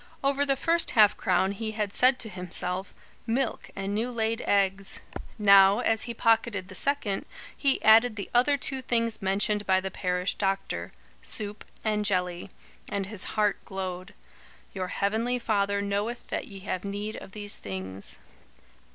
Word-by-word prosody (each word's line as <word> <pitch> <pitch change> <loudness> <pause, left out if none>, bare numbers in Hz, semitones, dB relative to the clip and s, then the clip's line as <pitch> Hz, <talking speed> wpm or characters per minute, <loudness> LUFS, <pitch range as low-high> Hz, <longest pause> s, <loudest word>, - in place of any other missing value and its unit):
Over 280 +1 +2
the 275 - +3
first 335 +5 +2
half 210 -1 +7
crown 190 +1 +1
he 220 +2 -4
had 210 -2 -2
said 255 +1 +4
to 225 - -3
himself: 180 0 -4 0.3
"Milk 240 +2 -1
and 195 +1 -3
new 225 +4 0
laid 230 -1 -1
eggs." 195 -1 +1 0.4
Now, 200 -1 +7
as 225 -3 +1
he - - -2
pocketed 225 -4 +1
the - - -9
second, 210 -3 0 0.3
he 275 -2 +1
added 220 +1 +6
the 200 -3 -5
other 255 +4 +4
two 265 0 -3
things 230 -2 0
mentioned 205 +2 0
by 190 -1 +4
the 190 0 -4
parish 180 0 -1
doctor: 195 - -2 0.3
"Soup 210 0 -2 0.2
and 210 -1 +1
jelly"; 180 -2 -1 0.4
and 200 -1 -2
his 205 -1 -4
heart 210 -2 +1
glowed. 185 -1 -6 0.6
"Your 185 -2 -3
heavenly 220 +6 0
Father 200 -3 0
knoweth 205 +4 -3
that - - -3
ye 195 -2 -10
have 185 -2 -3
need 205 +2 -4
of 190 - -11
these 205 -1 -4
things." 95 0 -4
205 Hz, 160 wpm, -27 LUFS, 190-225 Hz, 0.6 s, half